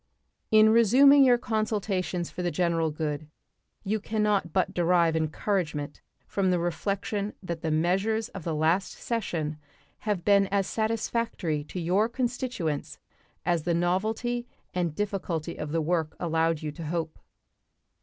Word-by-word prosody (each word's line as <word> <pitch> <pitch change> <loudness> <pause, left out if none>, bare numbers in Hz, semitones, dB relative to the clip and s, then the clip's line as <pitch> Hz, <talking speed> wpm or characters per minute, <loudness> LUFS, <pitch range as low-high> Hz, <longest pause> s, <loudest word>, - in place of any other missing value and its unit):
In 215 0 +6
resuming 265 +6 +7
your 250 -2 +6
consultations 210 -6 -1
for - - -5
the 175 - 0
general 165 -1 +1
good 150 -1 -3 0.6
you 215 +3 0
can 215 +1 -1
not 200 -5 +1
but 185 +2 +1
derive 170 -2 +3
encouragement 155 -2 -2 0.2
from 195 -2 0
the 180 - +3
reflection 200 +4 -2
that 170 -3 -4
the 160 - -1
measures 195 +8 +1
of 190 - -8
the 165 -1 -2
last 165 +5 +1
session 165 -10 -3 0.4
have 205 -5 -2
been 200 -1 +5
as 195 0 +1
satisfactory 220 -8 -1
to 180 - -6
your 185 +6 +2
constituents 240 - -2 0.5
as 175 -1 +2
the 170 +2 0
novelty 220 +8 0 0.3
and 175 -4 -1
difficulty 180 -5 -2
of 150 - -5
the 165 0 +1
work 160 -1 0
allowed 165 -2 0
you 150 - -3
to 165 +2 -8
hope. 165 -1 -3
180 Hz, 145 wpm, -27 LUFS, 165-215 Hz, 0.6 s, resuming